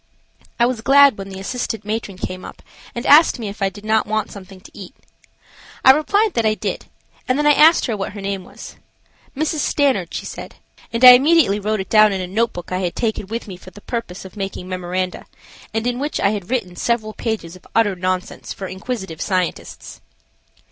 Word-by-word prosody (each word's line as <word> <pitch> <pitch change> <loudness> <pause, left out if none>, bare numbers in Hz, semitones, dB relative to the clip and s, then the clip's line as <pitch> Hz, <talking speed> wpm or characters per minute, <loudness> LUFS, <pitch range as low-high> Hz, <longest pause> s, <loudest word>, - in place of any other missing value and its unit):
I 235 - +5
was 240 -2 -2
glad 275 0 +6
when 195 0 -7
the 190 0 -8
assistant 225 0 -4
matron 210 -3 -4
came 185 0 -6
up - - -11 0.3
and 235 - -5
asked 305 +3 +6
me 225 -4 -5
if 205 +1 -10
I 195 - +2
did 205 +2 -13
not 220 0 +1
want 215 0 -2
something 195 -1 -12
to - - -16
eat. 200 +6 -11 0.9
I 265 - +11
replied 400 +9 +1
that 230 - 0
I 215 -1 +2
did, - - -4 0.4
and 255 - +1
then 295 - 0
I 295 - +6
asked 315 +3 +5
her 230 - -2
what 195 -1 -5
her 205 - -8
name 195 -1 -4
was. - - -12 0.6
Mrs. 310 +1 -1
Stanard, 270 - +1
she - - -5
said, - - -8 0.4
and 230 +2 +3
I - - +13
immediately 265 -5 +4
wrote 210 0 -1
it 190 - -9
down 215 -1 +6
in 195 - -2
a 185 - -3
notebook 195 -2 -2
I 185 - -1
had 180 -2 -3
taken 220 -4 -2
with 230 +3 -5
me 185 -3 -8
for 185 - -13
the 205 - -14
purpose 215 -7 -6
of 190 - -12
making 195 -2 -5
memoranda, 185 0 -4 0.4
and 225 +1 -2
in 245 0 -1
which 295 +2 -3
I 200 - +2
had 200 -4 -5
written 220 -9 -2
several 220 +2 -1
pages 215 -8 -4
of 185 - -17
utter 210 -4 +3
nonsense 185 0 -3
for 195 - -7
inquisitive 190 -3 -6
scientists. 185 -3 -3
215 Hz, 210 wpm, -20 LUFS, 190-245 Hz, 0.9 s, I